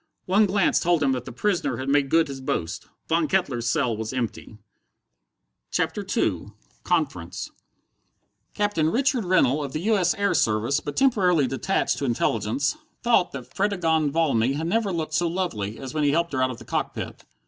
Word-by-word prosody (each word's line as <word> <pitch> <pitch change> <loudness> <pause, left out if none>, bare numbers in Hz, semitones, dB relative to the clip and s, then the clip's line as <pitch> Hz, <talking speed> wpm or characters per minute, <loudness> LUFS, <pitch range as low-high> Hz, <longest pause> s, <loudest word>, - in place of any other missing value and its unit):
One 205 +3 +4
glance 195 -1 +2
told 170 -3 +2
him 135 - +3
that 125 -2 -2
the - - -7
prisoner 175 - -1
had 130 - -5
made 140 0 +2
good 165 +1 +3
his 135 -1 -7
boast. 85 -10 -3 0.2
Von 165 -1 +2
Kettler's 135 -12 0
cell 125 -8 +1
was 110 +2 -5
empty! 115 -3 -4 1.1
CHAPTER - - -1
II 105 - -1 0.3
Conference 140 - -2 1.0
Captain 205 -7 +1
Richard 255 - +1
Rennell, 150 -6 +2
of 140 - -6
the 155 - -2
U. 215 +3 +2
S. 180 -2 +2
Air 200 0 +1
Service, 110 +6 +1
but 145 -1 -6
temporarily 185 - +3
detached 135 +9 0
to 140 - -1
Intelligence, 115 - 0 0.3
thought 235 -7 +3
that 125 -2 -8
Fredegonde 165 -7 +1
Valmy 135 -6 +2
had 155 +3 -3
never 205 +3 0
looked 160 -3 -3
so 170 +2 +2
lovely 140 - -3
as 130 -2 -7
when 155 -1 0
he 145 - +4
helped 170 +2 0
her 130 - 0
out 130 - +2
of 125 - -6
the 115 - -12
cockpit. - - -4
155 Hz, 180 wpm, -24 LUFS, 130-180 Hz, 1.1 s, One